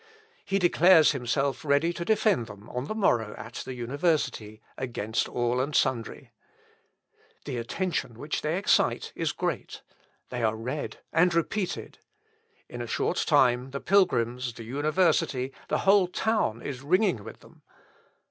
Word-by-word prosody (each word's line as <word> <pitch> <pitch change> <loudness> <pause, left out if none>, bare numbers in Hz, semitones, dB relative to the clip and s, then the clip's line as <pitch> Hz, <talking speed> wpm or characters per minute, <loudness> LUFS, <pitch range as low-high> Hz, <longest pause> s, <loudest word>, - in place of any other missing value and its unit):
He 195 - 0
declares 175 -2 +5
himself 135 0 -1
ready 150 +3 +2
to 170 - -4
defend 205 - +2
them 100 +2 -12
on 125 +1 -3
the 215 - -4
morrow 115 - +1
at 115 +2 -9
the 130 +1 -6
university, 125 -4 -1 0.2
against 115 -3 -2
all 120 +1 0
and 145 +3 -3
sundry. 130 -4 -1 1.1
The 125 - -4
attention 135 - -3
which 145 +5 -3
they 155 +3 -1
excite 200 - +1
is - - -1
great; - - -4 0.5
they 125 -1 -4
are 110 -1 +1
read 125 +7 -5 0.2
and 180 +2 +4
repeated. 180 +3 -2 0.7
In 120 - -7
a 120 - -5
short - - -1
time 125 0 +3
the 140 +1 -5
pilgrims, 125 -11 +1
the 115 - -8
university, 145 0 +1
the - - 0
whole 195 -1 +5
town 180 - -1
is 135 -3 -5
ringing 175 - +1
with 110 - -11
them. - - -19
135 Hz, 145 wpm, -27 LUFS, 120-170 Hz, 1.1 s, declares